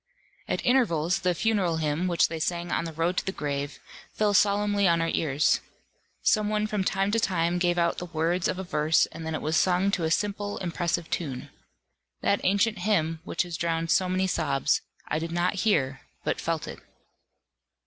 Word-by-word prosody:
At - - -2
intervals, 195 -9 +2
the 180 -2 0
funeral 195 -5 +1
hymn, 155 +3 0
which 175 -2 +3
they 165 0 -5
sing 170 +2 -2
on - - 0
the 165 - -4
road 165 +3 -1
to - - +1
the - - +1
grave, 145 -3 -3 0.4
fell 210 -1 +1
solemnly 205 0 +3
on 170 -1 +3
our 165 0 0
ears. 145 -1 +2 0.6
Some 215 -1 +3
one 210 0 0
from 210 -2 -1
time 195 +1 0
to 230 - +2
time 175 -4 +1
gave 175 0 +1
out 170 0 +1
the 180 - -6
words 170 +2 0
of - - -2
a 190 - -4
verse 155 -3 +2
and 165 -1 -7
then 160 - -2
it - - -5
was 155 +2 0
sung 185 +2 +2
to 180 -4 -1
a 160 - +1
simple 205 +3 -1
impressive 170 -1 -2
tune. 135 -7 -3 0.7
That 200 - +1
ancient 200 +2 +2
hymn, 165 -5 +1
which - - -1
has 175 -2 -6
drowned 165 0 -1
so 185 -1 +3
many 185 +1 +1
sobs, 140 -7 +1 0.3
I 155 - -1
did 165 +1 -4
not 175 +3 +1
hear, 135 - +1 0.2
but - - -1
felt - - -2
it. - - -8
175 Hz, 195 wpm, -27 LUFS, 165-195 Hz, 0.7 s, which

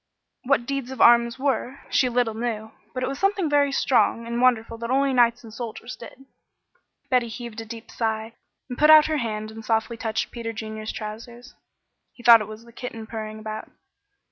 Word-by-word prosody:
What 255 -2 +2
deeds 275 -1 -3
of 265 - -8
arms 235 0 +5
were, 270 0 -2
she 255 - +3
little 240 -2 +1
knew, 220 -1 -4 0.2
but 255 - -4
it - - 0
was 270 +1 -4
something 390 -3 +1
very 285 -1 +3
strong 240 -3 +2
and 235 +1 -2
wonderful 230 -2 +2
that 235 0 -5
only 270 +1 +2
knights 240 -1 +3
and 220 -2 -12
soldiers 235 +1 -7
did. 255 +3 -13 0.9
Betty 250 -2 +3
heaved 230 -1 -7
a - - -8
deep 225 0 -10
sigh, 220 0 -2 0.3
and 245 -2 -7
put 300 - +5
out 310 -1 +9
her 310 -1 0
hand 215 -4 -3
and 220 0 -10
softly 225 +1 0
touched 220 -1 -2
Peter 230 -1 -5
Junior's 220 0 -5
trousers. 235 +3 -8 0.6
He 240 - -16
thought 230 -1 +9
it 210 - -5
was 215 +2 -10
the 235 - -17
kitten 230 -2 -7
purring 215 -1 -6
about. 215 0 -7
235 Hz, 195 wpm, -24 LUFS, 220-255 Hz, 0.9 s, out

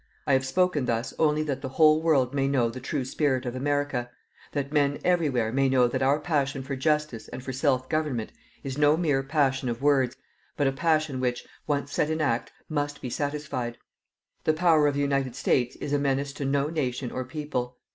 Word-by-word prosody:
I 140 - +2
have 130 0 +2
spoken 180 -2 +1
thus 115 0 -1
only 155 -1 +3
that 140 -3 -3
the 130 - -4
whole 155 +2 +5
world 140 -6 +2
may 135 -1 +1
know 125 -4 +2
the 130 - -7
true 135 +1 -3
spirit 130 -1 0
of 120 0 -3
America 145 -2 -1 0.4
that 140 0 -3
men 145 -1 +2
everywhere 145 -11 +2
may 135 +2 +2
know 130 -2 +4
that 130 +2 -2
our 140 +3 +3
passion 140 -4 -1
for 135 +1 -4
justice 150 -3 0
and 130 - -8
for 130 - -5
self 130 -1 +1
government 150 -8 -1 0.3
is 135 +1 -4
no 150 +1 +5
mere 150 -6 +1
passion 135 -2 +1
of 120 +3 -4
words, 135 -4 +3 0.4
but 145 - +2
a 135 - +3
passion 155 -1 +1
which, 125 -1 -1 0.2
once 145 -1 -1
set 150 - +1
in 160 0 -1
act, 130 -6 0 0.2
must 145 -2 -2
be 125 - -6
satisfied. 140 -5 -3 0.7
The 155 - +3
power 155 -2 +4
of 145 - 0
the 145 - 0
United 135 -3 0
States 125 -2 +1
is 145 - -4
a 145 - +3
menace 140 0 0
to 140 - -4
no 140 +1 +1
nation 130 -5 -2
or 130 - -3
people. 130 -2 -4
140 Hz, 205 wpm, -27 LUFS, 130-150 Hz, 0.7 s, whole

